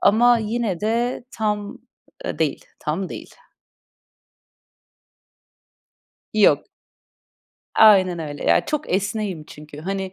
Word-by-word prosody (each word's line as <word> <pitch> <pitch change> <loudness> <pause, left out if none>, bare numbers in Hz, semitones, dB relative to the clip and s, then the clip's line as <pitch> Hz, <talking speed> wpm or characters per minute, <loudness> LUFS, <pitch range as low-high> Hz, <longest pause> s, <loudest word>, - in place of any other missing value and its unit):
Ama 235 +3 +5
yine 220 -4 -2
de 235 +3 -1
tam, 210 +2 -3 0.5
ııı, - - -4
değil, 155 -3 -1
tam 175 +5 -3
değil. - - -9 3.0
Yok. - - +4 1.1
Aynen 190 -5 +6
öyle. 145 -2 -6
Ya, - - +3
çok 300 -1 -3
esneğim 200 -4 -2
çünkü, 150 -1 -12
hani, 190 +1 -4
200 Hz, 95 wpm, -22 LUFS, 175-220 Hz, 3.0 s, Aynen